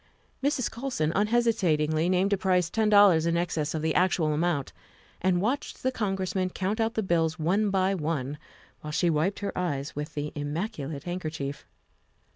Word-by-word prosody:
Mrs. 270 -3 0
Colson 235 - -2
unhesitatingly 185 -8 +2
named 185 +2 +2
a - - +2
price 180 -3 +1
ten 220 -1 +2
dollars 200 -6 +6
in 170 0 +1
excess 160 -3 -1
of 155 - -3
the 160 -1 +1
actual 175 -4 +2
amount 155 -3 -1 0.5
and 180 -1 +2
watched 260 +6 -2
the 260 - +2
Con 205 -6 -1
gressman 185 0 -1
count 195 +5 -2
out 225 +1 0
the 220 - 0
bills 165 -3 +1
one 195 +7 +1
by 190 0 +2
one, 150 -5 -2 0.4
while 150 - -8
she 170 +2 +1
wiped 160 +7 0
her 200 - -3
eyes 145 -5 -2
with 150 +1 -5
the 150 0 -3
immaculate 150 - -4
handkerchief. 155 -5 -5
175 Hz, 170 wpm, -27 LUFS, 155-200 Hz, 0.5 s, dollars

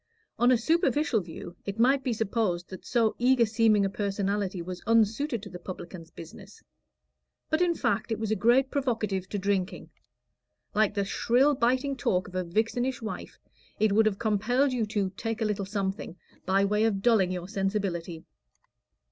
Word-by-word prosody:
On 240 +1 +5
a 250 - +5
superficial 290 -2 +1
view 170 0 -9
it 200 +1 -5
might 265 +4 +3
be 255 - -1
supposed 215 -5 -1
that 185 - -9
so 230 -3 +2
eager 250 -1 +4
seeming 215 -2 +3
a - - 0
personality 200 -1 -2
was 180 +1 -6
unsuited 230 +2 +2
to 205 - -8
the 180 - -8
publican's 175 -2 -8
business; 165 0 -12 0.9
but 315 +2 +2
in 350 -1 +2
fact, 215 -4 -1
it 225 - 0
was 220 -1 -3
a - - +3
great 250 +5 +3
provocative 215 -9 -1
to 205 - -3
drinking. 195 0 -2 0.8
Like 215 0 +2
the 200 -1 0
shrill 250 +8 +2
biting 260 +2 +1
talk 185 -7 0
of 185 - -13
a 185 0 -1
vixenish 230 +8 -1
wife, 225 -1 -7 0.4
it 215 -1 +3
would 215 +2 +4
have 200 -2 0
compelled 230 +5 +1
you 230 -4 0
to 205 -3 -1
"take 225 +3 -4
a 225 - 0
little 205 -2 -1
something" 195 -3 -3 0.3
by 195 +1 +3
way 210 +2 +2
of 200 -3 0
dulling 210 -6 +4
your 180 -1 -4
sensibility. 195 -5 -2
215 Hz, 175 wpm, -28 LUFS, 195-240 Hz, 0.9 s, On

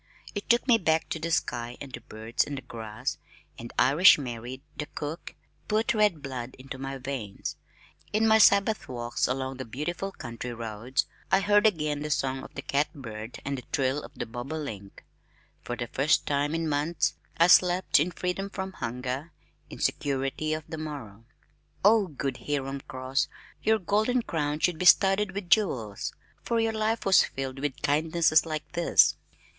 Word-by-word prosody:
It 205 - -5
took 235 +3 +3
me 235 -3 +6
back 160 -4 +1
to 160 - -3
the 165 +2 -3
sky 120 -6 -1
and 135 -3 -9
the - - -6
birds 110 +2 -2
and 145 - -5
the 135 - -7
grass 110 -3 -5 0.4
and 120 - -8
Irish 145 +10 +7
Mary, 125 -1 -6
the 150 - -4
cook, 150 +3 -6 0.3
put 220 +1 +1
red 210 -8 +2
blood 130 -2 -5
into 130 0 -8
my 135 0 -4
veins. 125 -7 -5 0.6
In 220 +1 +2
my 220 0 +6
sabbath 200 0 +4
walks 120 -1 -1
along 130 +1 -2
the 130 - -4
beautiful 160 - -4
country 120 -5 -6
roads, 115 +4 -2 0.3
I 190 - +6
heard 205 +2 +5
again 150 -7 0
the 150 +1 -4
song 135 -3 0
of - - -12
the 140 - -5
cat 145 0 0
bird 115 -4 -7
and 140 -1 -2
the - - -11
trill 135 +1 +1
of - - -12
the - - -4
bobolink. 120 -4 -6 0.6
For 120 - -4
the 120 - -3
first 140 +5 +2
time 145 +2 0
in 165 0 -1
months 150 +2 0 0.2
I 170 - +6
slept 180 -1 +5
in 155 +5 +2
freedom 180 +2 -3
from 190 -1 -5
hunger, 125 +4 -4 0.4
in - - -9
security 140 +2 -1
of 155 - -6
the 160 - -6
morrow. 120 -9 -7 0.6
Oh, 210 -1 +6
good 135 -4 -3
Hiram 140 -1 -2
Cross, 130 +1 -1 0.3
your 220 0 +3
golden 215 +5 +1
crown 150 -4 -2
should 175 -3 +1
be 180 - -1
studded 195 +1 +5
with 195 -3 -6
jewels, 115 - +1 0.3
for 235 -1 0
your 225 0 +1
life 220 +1 0
was 195 -2 +6
filled 135 0 -5
with 140 -2 -3
kindnesses 160 +2 +3
like 155 -1 -4
this! 170 -1 +4
145 Hz, 175 wpm, -28 LUFS, 130-180 Hz, 0.6 s, Irish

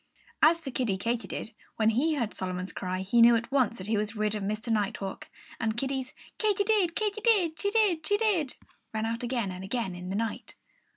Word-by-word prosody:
As 335 +1 +6
for 275 -5 -6
Kiddie 235 -6 0
Katydid, 230 +1 -3 0.2
when 220 0 +3
he 300 +8 +2
heard 235 -7 -1
Solomon's 185 0 -4
cry 185 0 -3
he 215 +5 +3
knew 235 0 +8
at 230 +3 -2
once 255 -4 +2
that 185 - -7
he 215 +1 +1
was 210 +1 -2
rid 210 0 0
of 210 - -3
Mr. 215 +3 -1
Nighthawk. 200 -2 -2 0.3
And 220 -1 -1
Kiddie's 265 0 -2 0.3
Katy 415 -2 +2
did, 400 -5 +2
Katy 430 0 -1
did; 380 -9 +2
she 405 - +1
did, 405 -7 +2
she 410 - +3
did 390 - +1 0.4
rang 220 0 0
out 230 +2 -2
again 240 -5 -1
and 185 +1 -7
again 200 -1 -2
in 180 +1 -7
the 190 - -2
night. 225 +1 -3
235 Hz, 210 wpm, -29 LUFS, 210-320 Hz, 0.4 s, knew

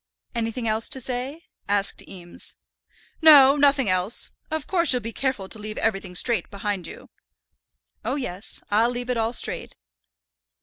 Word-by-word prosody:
"Anything 230 +1 -3
else 220 +1 0
to 265 - +1
say?" 260 +6 -5 0.3
asked 200 -1 0
Eames. 175 -2 -8 0.7
"No, 285 -4 +9
nothing 280 -3 +3
else. 185 +4 +1 0.2
Of 315 -2 -4
course 345 -2 +2
you'll 250 - +4
be 230 +1 -6
careful 260 -8 -2
to 220 - -6
leave 215 0 -7
everything 195 -4 -2
straight 225 -1 +1
behind 200 -3 -4
you." - - -11 0.9
"Oh, 250 +5 -2
yes; 210 -8 -5
I'll 225 +3 +3
leave 245 0 -4
it 245 - -2
all 225 0 0
straight." 240 - -1
230 Hz, 155 wpm, -23 LUFS, 205-265 Hz, 0.9 s, No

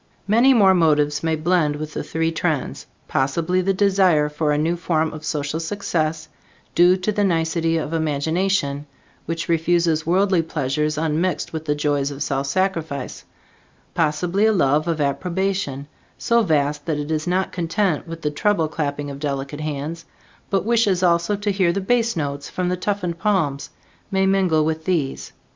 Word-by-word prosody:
Many 235 +6 +5
more 195 -4 +6
motives 150 -4 +2
may 160 -1 0
blend 155 -2 +1
with 155 +1 -6
the - - -3
three 165 0 -1
trends; 160 -4 -2 0.2
possibly 165 +7 0
the 195 +2 +1
desire 190 -6 +3
for 150 0 -1
a 145 - +1
new 160 +3 +1
form 160 -2 -1
of 155 0 -8
social 150 0 -2
success 160 -3 -2 0.5
due 180 +2 +5
to 185 +3 -1
the 205 0 0
nicety 165 -2 +1
of 160 0 -3
imagination, 155 -1 0 0.4
which 165 0 -3
refuses 165 -1 +2
worldly 185 +2 +2
pleasures 150 0 -2
unmixed 160 +4 -1
with 160 0 -5
the 150 -1 0
joys 145 -1 0
of 140 0 -4
self 135 0 -2
sacrifice; 160 -5 -2 0.7
possibly 175 +6 +1
a - - +4
love 155 -4 +2
of 165 -2 -1
approbation, 170 -1 -1 0.3
so 235 0 +2
vast 150 -5 0
that 155 -3 0
it 150 +1 -4
is 155 +2 -1
not 185 +2 0
content 175 -1 -1
with 165 0 -8
the 150 - 0
treble 165 0 +1
clapping 145 -2 -3
of 140 - -8
delicate 140 0 -4
hands, 155 +2 -4 0.4
but 195 -1 0
wishes 215 -6 +2
also 170 +3 +2
to 205 0 -1
hear 190 -3 +2
the 195 - -1
bass 230 +3 +1
notes 145 -2 -3
from 180 0 -1
toughened 180 -3 -2
palms, 160 -10 0 0.4
may 190 0 +1
mingle 185 -5 +2
with 160 0 -2
these. 160 -8 -1
165 Hz, 165 wpm, -21 LUFS, 150-185 Hz, 0.7 s, more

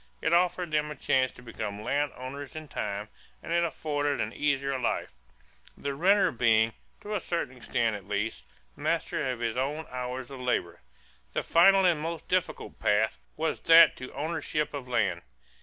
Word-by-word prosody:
It - - 0
offered 175 -1 +2
them 150 0 +1
a 150 - -6
chance 130 -2 +1
to 125 - -14
become 110 -3 -5
land 145 +3 0
owners 130 +2 -7
in 155 -1 -7
time 105 -5 -4 0.3
and 165 - -3
it 170 0 +3
afforded 145 -2 -1
an - - -2
easier 140 -2 0
life, 120 - -1 0.6
the 140 0 -3
renter 190 +7 +4
being, 115 -1 +3 0.3
to 210 - -5
a 210 - +1
certain 170 -8 -3
extent 115 -2 0
at 100 -2 -9
least, 105 - -2 0.3
master 130 - -1
of 125 -2 -3
his 115 0 -1
own 145 +5 -1
hours 125 +1 -4
of 135 - -8
labor. 90 -9 -1 0.5
The - - -1
final 195 +3 +6
and 170 -4 +3
most 165 +1 -4
difficult 185 -1 -2
path 110 0 +2 0.2
was 160 +1 -1
that 165 0 +8
to 130 - -8
ownership 150 -1 -2
of 140 -3 -5
land. 95 -8 +1
140 Hz, 175 wpm, -28 LUFS, 120-160 Hz, 0.6 s, that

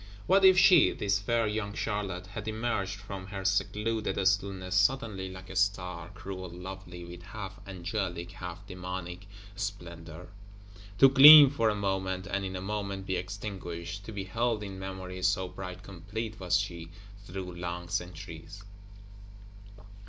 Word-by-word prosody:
What 195 +1 +4
if 190 -1 +8
she, 180 -4 +7
this 100 0 0
fair 115 +3 +1
young 105 -1 -3
Charlotte, 95 -3 -3
had 105 +3 -7
emerged 110 -3 -2
from 100 -2 -8
her 95 -1 -6
secluded 105 +3 0
stillness, 95 -1 0
suddenly 100 -2 +1
like 95 0 -10
a - - -8
Star; 90 -4 0
cruel 95 -2 -7
lovely, 90 0 -9
with 85 0 -10
half 100 0 -8
angelic, 90 -1 -4
half 90 0 -8
demonic 90 0 -6 0.3
splendor; 85 -4 -7 0.7
to 135 - +8
gleam 140 +1 +11
for 115 -6 +2
a 105 - 0
moment, 95 -2 -2
and 100 0 -2
in 95 0 -4
a 90 - -4
moment 100 -1 -4
be 95 - -1
extinguished: 90 -1 -5
to - - -7
be 100 -2 -4
held 110 +3 -1
in 95 -2 -7
memory, 95 -1 -6
so 95 0 +1
bright 90 0 -8
complete 100 +4 -6
was 90 -1 +2
she, 85 -5 -4 0.4
through 90 0 -6
long 85 0 -5
centuries! 90 +1 -6
95 Hz, 145 wpm, -29 LUFS, 90-105 Hz, 0.7 s, gleam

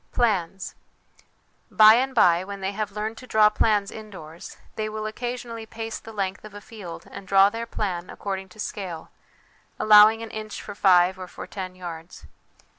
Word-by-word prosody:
Plans. 195 -5 -1 1.0
By 215 0 +8
and 260 +3 +1
by, 175 -5 +4
when 200 +1 -7
they 190 +1 -2
have 210 0 -4
learned 215 +2 -4
to 255 - -12
draw 215 -2 +5
plans 210 -2 +1
indoors, 185 -7 -10 0.2
they 215 0 -3
will 215 0 -5
occasionally 230 0 -5
pace 225 0 -6
the 225 - -11
length 195 -3 -3
of 215 -1 -11
a - - -7
field 205 -5 -10
and 190 - -10
draw 195 +1 +5
their 230 +1 -5
plan 185 -6 -4
according 190 -1 -5
to 200 - -18
scale, 185 -6 -6 0.7
allow 210 0 +8
ing 225 +1 -5
an 225 - -8
inch 215 -1 -6
for - - -8
five 185 -2 +4
or 185 - -7
for - - -9
ten 185 -2 -7
yards. 170 -2 -9
210 Hz, 180 wpm, -24 LUFS, 190-220 Hz, 1.0 s, By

